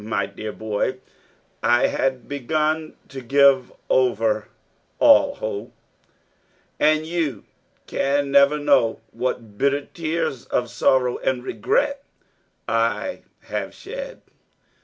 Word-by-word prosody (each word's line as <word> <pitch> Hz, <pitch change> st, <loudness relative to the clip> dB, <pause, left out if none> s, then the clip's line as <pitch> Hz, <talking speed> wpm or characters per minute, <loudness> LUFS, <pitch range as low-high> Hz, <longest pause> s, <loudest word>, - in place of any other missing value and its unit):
My 110 Hz, -, -1 dB
dear 110 Hz, 0 st, -7 dB
boy, 110 Hz, +4 st, -2 dB, 0.6 s
I 120 Hz, 0 st, +4 dB
had 130 Hz, -3 st, -1 dB
begun 155 Hz, +3 st, -1 dB
to 135 Hz, -1 st, -7 dB
give 135 Hz, 0 st, +4 dB, 0.2 s
over 115 Hz, -4 st, +1 dB, 0.5 s
all -, -, +5 dB
hope 110 Hz, +2 st, -5 dB, 1.1 s
and 155 Hz, +1 st, +3 dB
you 160 Hz, -, -2 dB, 0.4 s
can 140 Hz, 0 st, 0 dB
never 140 Hz, +1 st, +5 dB
know 135 Hz, -6 st, +2 dB
what 115 Hz, -5 st, -4 dB
bitter 140 Hz, +1 st, +1 dB
tears 160 Hz, -6 st, -3 dB
of 120 Hz, -1 st, -1 dB
sorrow 125 Hz, -2 st, +2 dB
and 125 Hz, -2 st, -1 dB
regret 275 Hz, -, 0 dB, 0.6 s
I 115 Hz, -, 0 dB, 0.2 s
have -, -, -5 dB
shed. -, -, -8 dB
135 Hz, 105 wpm, -22 LUFS, 115-155 Hz, 1.1 s, all